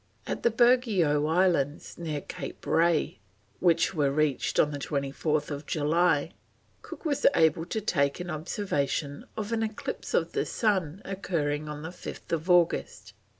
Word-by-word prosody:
At -, -, -3 dB
the -, -, +4 dB
Burgeo 220 Hz, -, +3 dB
Islands, 165 Hz, -4 st, +1 dB
near 155 Hz, -4 st, -3 dB
Cape -, -, -8 dB
Ray, 165 Hz, -6 st, +2 dB, 0.4 s
which 170 Hz, -1 st, +3 dB
were 145 Hz, -5 st, +2 dB
reached 145 Hz, -1 st, 0 dB
on 150 Hz, -, +4 dB
24th 145 Hz, +1 st, -2 dB
July, 160 Hz, +1 st, +2 dB, 0.5 s
Cook -, -, -10 dB
was 290 Hz, -3 st, +2 dB
able 160 Hz, 0 st, +3 dB
to 220 Hz, -, -2 dB
take 140 Hz, -8 st, +1 dB
an 180 Hz, 0 st, -4 dB
observation 150 Hz, -3 st, -2 dB
of 215 Hz, 0 st, -3 dB
an 225 Hz, -1 st, 0 dB
eclipse 220 Hz, -1 st, -4 dB
of -, -, +1 dB
the -, -, -1 dB
sun 190 Hz, -5 st, 0 dB
occurring 155 Hz, -6 st, -2 dB
on 150 Hz, 0 st, -6 dB
5th 165 Hz, 0 st, -5 dB
August. 175 Hz, -2 st, +2 dB
160 Hz, 135 wpm, -28 LUFS, 145-185 Hz, 0.5 s, the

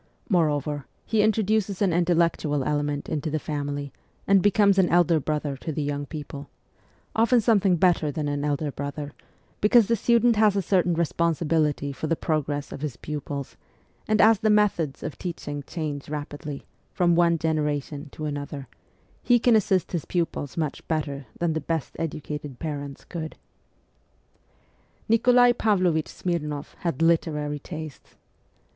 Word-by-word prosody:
Moreover, 150 Hz, -, +1 dB, 0.2 s
he 220 Hz, -2 st, +2 dB
introduces 215 Hz, -2 st, +1 dB
an 195 Hz, -4 st, +2 dB
intellectual 165 Hz, -4 st, +1 dB
element 145 Hz, 0 st, -1 dB
into 155 Hz, +1 st, -2 dB
the 155 Hz, -, -1 dB
family 145 Hz, -2 st, -4 dB, 0.3 s
and 195 Hz, -1 st, +5 dB
becomes 200 Hz, -1 st, +4 dB
an 185 Hz, -, +4 dB
elder 170 Hz, -1 st, +4 dB
brother 150 Hz, 0 st, -2 dB
to 160 Hz, -, -5 dB
the 150 Hz, 0 st, -2 dB
young 145 Hz, 0 st, -3 dB
people 145 Hz, -2 st, -7 dB, 0.7 s
often 230 Hz, +2 st, +4 dB
something 205 Hz, -5 st, +3 dB
better 165 Hz, -3 st, +2 dB
than 150 Hz, +1 st, -3 dB
an 145 Hz, 0 st, -2 dB
elder 145 Hz, 0 st, -1 dB
brother, 145 Hz, +1 st, -5 dB, 0.5 s
because 220 Hz, +2 st, +6 dB
the 230 Hz, -, +2 dB
student 235 Hz, +1 st, +3 dB
has 210 Hz, -2 st, +4 dB
a 200 Hz, -, +2 dB
certain 180 Hz, -1 st, +2 dB
re 170 Hz, +1 st, +2 dB
sponsibility 155 Hz, -3 st, 0 dB
for 145 Hz, +4 st, -4 dB
the 165 Hz, -, +1 dB
progress 150 Hz, -3 st, -2 dB
of -, -, -7 dB
his 150 Hz, -6 st, -4 dB
pupils; 145 Hz, -2 st, -5 dB, 0.5 s
and 215 Hz, 0 st, +2 dB
as 220 Hz, -1 st, +6 dB
the 220 Hz, -1 st, +1 dB
methods 200 Hz, -9 st, +2 dB
of 155 Hz, -, -6 dB
teaching 145 Hz, -5 st, -5 dB
change 150 Hz, -5 st, -4 dB
rapidly, 145 Hz, -1 st, -6 dB, 0.3 s
from 175 Hz, -1 st, +2 dB
one 170 Hz, 0 st, +4 dB
genera 150 Hz, -2 st, 0 dB
tion 145 Hz, +1 st, -9 dB
to 155 Hz, -, -7 dB
another, 145 Hz, -2 st, -5 dB, 0.5 s
he 245 Hz, +1 st, +4 dB
can 235 Hz, 0 st, +4 dB
assist 190 Hz, -4 st, +2 dB
his 170 Hz, -4 st, -2 dB
pupils 165 Hz, -5 st, -2 dB
much 155 Hz, -4 st, -2 dB
better 145 Hz, -4 st, -2 dB
than 170 Hz, -2 st, 0 dB
the 160 Hz, -, -2 dB
best 160 Hz, -1 st, -3 dB
educated 150 Hz, -4 st, -5 dB
parents 145 Hz, -2 st, -5 dB
could, 160 Hz, -3 st, -6 dB, 1.7 s
Nikolai 245 Hz, +2 st, +5 dB
Pavlovich 185 Hz, -9 st, +1 dB
Smirnoff 150 Hz, -5 st, -3 dB
had 165 Hz, -3 st, -2 dB
literary 150 Hz, -3 st, +1 dB
tastes. 155 Hz, -1 st, -9 dB
160 Hz, 150 wpm, -25 LUFS, 145-185 Hz, 1.7 s, because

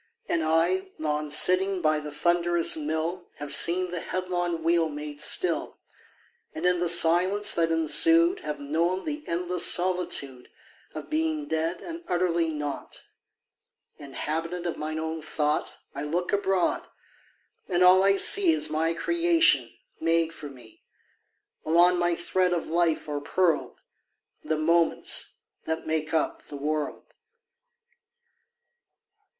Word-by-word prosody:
And 170 Hz, -, 0 dB
I 170 Hz, +4 st, +1 dB
Long 150 Hz, -1 st, -2 dB
sitting 185 Hz, +5 st, +3 dB
by 155 Hz, -2 st, +1 dB
the 150 Hz, 0 st, -8 dB
thunderous 170 Hz, +2 st, +1 dB
mill 160 Hz, +3 st, -3 dB
Have 145 Hz, -1 st, -4 dB
seen 175 Hz, +4 st, +2 dB
the 180 Hz, -, -3 dB
headlong 175 Hz, -2 st, -3 dB
wheel 165 Hz, -1 st, +2 dB
made 150 Hz, 0 st, -7 dB
still, 170 Hz, +2 st, -1 dB, 0.8 s
And 160 Hz, -, -4 dB
in 180 Hz, 0 st, +2 dB
the 175 Hz, -1 st, +2 dB
silence 180 Hz, +5 st, +3 dB
that 165 Hz, -1 st, +1 dB
ensued 330 Hz, -, +4 dB
Have 150 Hz, -1 st, -5 dB
known 165 Hz, +6 st, -1 dB
the 300 Hz, -1 st, -4 dB
endless 175 Hz, +1 st, +2 dB
solitude 175 Hz, -8 st, -1 dB, 0.5 s
Of -, -, -8 dB
being 310 Hz, -1 st, -1 dB
dead 165 Hz, -, -2 dB
and 335 Hz, 0 st, -7 dB
utterly 170 Hz, -2 st, 0 dB
nought. 150 Hz, -2 st, -6 dB, 1.0 s
Inhabitant 165 Hz, +5 st, -4 dB
of 170 Hz, -, -2 dB
mine 155 Hz, +1 st, -4 dB
own 160 Hz, 0 st, -4 dB
thought, 150 Hz, -1 st, -2 dB, 0.2 s
I 140 Hz, -, -5 dB
look 170 Hz, +6 st, -2 dB
abroad, 195 Hz, -2 st, 0 dB, 0.8 s
and 180 Hz, -1 st, +1 dB
all 185 Hz, +1 st, +7 dB
I 195 Hz, 0 st, +3 dB
see 380 Hz, -, +3 dB
Is 315 Hz, -1 st, -1 dB
my 165 Hz, +2 st, 0 dB
creation, 335 Hz, -, +3 dB, 0.3 s
made 165 Hz, 0 st, +1 dB
for 150 Hz, -3 st, -9 dB
me: 125 Hz, -5 st, -16 dB, 0.8 s
Along 175 Hz, +2 st, +4 dB
my 175 Hz, -1 st, +1 dB
thread 180 Hz, +1 st, 0 dB
of 170 Hz, -, -2 dB
life 165 Hz, -1 st, 0 dB
are 145 Hz, -1 st, -3 dB
pearled 165 Hz, +1 st, 0 dB, 0.6 s
The 155 Hz, -, -1 dB
moments 165 Hz, +2 st, +1 dB, 0.3 s
that 160 Hz, 0 st, -3 dB
make 155 Hz, -1 st, -2 dB
up 160 Hz, -2 st, -2 dB
the 145 Hz, -, -8 dB
world. 150 Hz, +1 st, -4 dB
170 Hz, 130 wpm, -26 LUFS, 155-180 Hz, 1.0 s, all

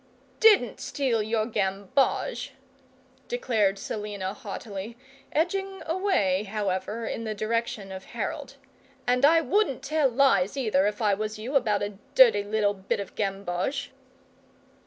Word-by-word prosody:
"DIDN'T 415 Hz, -, +5 dB
steal 255 Hz, -6 st, 0 dB
your 215 Hz, 0 st, 0 dB
gamboge," 220 Hz, +5 st, 0 dB, 0.7 s
declared 220 Hz, -5 st, +1 dB
Selina, 205 Hz, -2 st, -4 dB
haughtily, 210 Hz, +2 st, -7 dB, 0.3 s
edging 385 Hz, +4 st, -1 dB
away, 320 Hz, -, +1 dB
however, 210 Hz, +1 st, -3 dB
in 230 Hz, -, -4 dB
the 215 Hz, -1 st, -3 dB
direction 215 Hz, -2 st, -2 dB
of 190 Hz, 0 st, -8 dB
Harold. 270 Hz, +5 st, -5 dB, 0.5 s
"And 250 Hz, +1 st, +2 dB
I 325 Hz, +3 st, +6 dB
wouldn't 325 Hz, -, +1 dB
tell 305 Hz, -2 st, +2 dB
lies, 240 Hz, -4 st, +3 dB
either, 210 Hz, -7 st, +2 dB
if 210 Hz, +2 st, -3 dB
I 205 Hz, -1 st, +4 dB
was 215 Hz, +2 st, -3 dB
you, 240 Hz, +7 st, -5 dB
about 210 Hz, -6 st, +2 dB
a 205 Hz, -1 st, -5 dB, 0.2 s
dirty -, -, +7 dB
little 205 Hz, 0 st, +1 dB
bit 195 Hz, 0 st, -3 dB
of 200 Hz, -, -6 dB
gamboge." 200 Hz, +7 st, -2 dB
220 Hz, 130 wpm, -27 LUFS, 200-275 Hz, 0.7 s, dirty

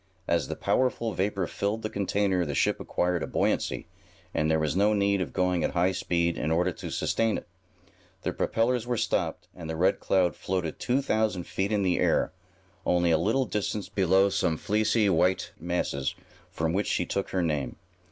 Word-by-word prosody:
As 85 Hz, -5 st, +1 dB
the -, -, -4 dB
powerful 120 Hz, -3 st, 0 dB
vapor 95 Hz, -1 st, 0 dB
filled 105 Hz, +5 st, -2 dB
the -, -, 0 dB
container 100 Hz, -2 st, +1 dB
the 75 Hz, -4 st, -3 dB
ship -, -, +2 dB
acquired 90 Hz, -1 st, 0 dB
a -, -, -2 dB
buoyancy, -, -, 0 dB, 0.5 s
and 75 Hz, -, +1 dB
there 80 Hz, -, +3 dB
was 80 Hz, 0 st, 0 dB
no 105 Hz, +2 st, +3 dB
need 100 Hz, -1 st, +2 dB
of -, -, -3 dB
going 90 Hz, -2 st, +1 dB
at -, -, 0 dB
high 90 Hz, +1 st, +3 dB
speed 85 Hz, -2 st, 0 dB
in 75 Hz, -, -1 dB
order 85 Hz, +2 st, +2 dB
to -, -, -7 dB
sustain 115 Hz, -1 st, 0 dB
it. -, -, -9 dB, 0.8 s
The -, -, -1 dB
propellers 120 Hz, +1 st, 0 dB
were 120 Hz, -1 st, 0 dB
stopped, -, -, -1 dB
and 80 Hz, -3 st, -8 dB
the 80 Hz, -, -2 dB
Red 95 Hz, +4 st, +2 dB
Cloud 90 Hz, -2 st, +2 dB
floated 90 Hz, -4 st, -3 dB
two 130 Hz, +3 st, +1 dB
thousand 110 Hz, -7 st, 0 dB
feet 95 Hz, +2 st, -2 dB
in 105 Hz, -2 st, +1 dB
the 90 Hz, -2 st, +1 dB
air, -, -, +2 dB, 0.5 s
only 90 Hz, -1 st, +2 dB
a 80 Hz, -, +5 dB
little 115 Hz, +9 st, +2 dB
distance 105 Hz, -3 st, -2 dB
below 95 Hz, -1 st, +3 dB
some 85 Hz, -4 st, 0 dB
fleecy, 105 Hz, +2 st, +2 dB
white 90 Hz, 0 st, +2 dB
masses 80 Hz, -5 st, -2 dB, 0.3 s
from 80 Hz, 0 st, -1 dB
which 100 Hz, +3 st, 0 dB
she 90 Hz, -, 0 dB
took 100 Hz, +3 st, -2 dB
her 95 Hz, -2 st, 0 dB
name. 75 Hz, -6 st, -1 dB
95 Hz, 190 wpm, -27 LUFS, 85-105 Hz, 0.8 s, a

